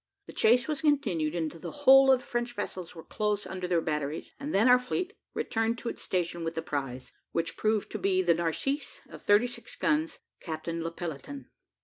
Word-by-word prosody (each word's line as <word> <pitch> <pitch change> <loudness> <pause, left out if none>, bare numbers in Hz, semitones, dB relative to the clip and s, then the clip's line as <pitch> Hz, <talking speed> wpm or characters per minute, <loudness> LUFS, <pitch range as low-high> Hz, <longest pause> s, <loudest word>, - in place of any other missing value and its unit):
The - - -11
chase 245 +5 +4
was 305 -2 -2
continued 175 - +1
until 165 -1 -3
the - - -6 0.2
whole 270 0 +9
of 255 -1 +4
the - - -15
French 240 0 -2
vessels 185 -4 -5
were 165 - -9
close 210 -1 -1
under 185 -1 -4
their 175 -2 +2
batteries, 150 -1 -3
and 290 +2 -4
then 215 +5 +4
our 250 0 +7
fleet 360 +10 -3 0.2
returned 225 +1 0
to 235 - -4
its - - -7
station 175 -2 -1
with 165 0 -3
the 160 - -2
prize, 135 -4 -4 0.2
which 165 0 -1
proved 215 -1 0
to - - -4
be 185 -1 +2
the 175 -1 +5
Narcisse, 170 - -2
of - - -11
thirty 205 +3 +4
six 245 - -7
guns, 315 0 +1 0.2
Captain 165 0 -4
Le 165 - -2
Pelleteon. 175 - -7
195 Hz, 205 wpm, -29 LUFS, 165-250 Hz, 0.2 s, whole